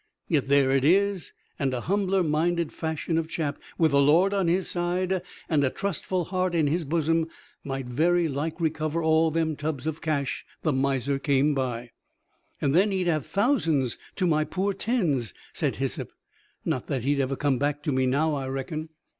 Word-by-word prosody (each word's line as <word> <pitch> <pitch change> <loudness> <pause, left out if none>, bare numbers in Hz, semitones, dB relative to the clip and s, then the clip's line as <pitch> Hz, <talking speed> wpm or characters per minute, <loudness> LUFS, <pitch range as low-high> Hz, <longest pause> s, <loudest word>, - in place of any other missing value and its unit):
Yet 145 -5 +1
there 140 -1 +4
it 135 -1 +2
is: 195 +3 +2 0.3
and 135 -2 +1
a 120 - -3
humbler 195 +1 +1
minded 170 +2 +1
fashion 160 +1 -1
of 160 - -3
chap, 155 -3 -3 0.2
with 160 -3 +3
the 140 0 +4
Lord 170 +8 +4
on 195 -3 +1
his 180 +2 +1
side, 180 +1 0 0.3
and 150 -4 +2
a 130 - +3
trustful 185 +2 -2
heart 185 -1 -1
in 160 -2 +3
his 160 +3 0
bosom, 165 +2 +1 0.4
might 135 -2 -4
very 165 +7 +2
like 150 +4 -3
recover 160 0 -1
all 160 0 +4
them 160 -1 0
tubs 150 -2 -3
of 160 0 -3
cash 145 -4 -1 0.2
the 155 - +2
miser 135 0 0
come 140 +1 +2
by." 125 -3 -3 0.7
"And 140 -1 +1
then 190 +6 +4
he'd 190 -2 0
have 155 -5 0
thousands 165 - +1 0.2
to 185 - 0
my 155 -3 +3
poor 195 +5 -1
tens," 175 - 0 0.2
said - - -1
Hyssop. - - -2 0.6
"Not - - -1
that 130 -4 -2
he'd 140 +2 +1
ever 135 0 0
come 135 -2 +1
back 145 +1 -1
to 150 - 0
me 130 -1 +2
now, 150 +4 +2
I 135 -2 -2
reckon." 155 +4 -4
155 Hz, 185 wpm, -26 LUFS, 140-175 Hz, 0.7 s, there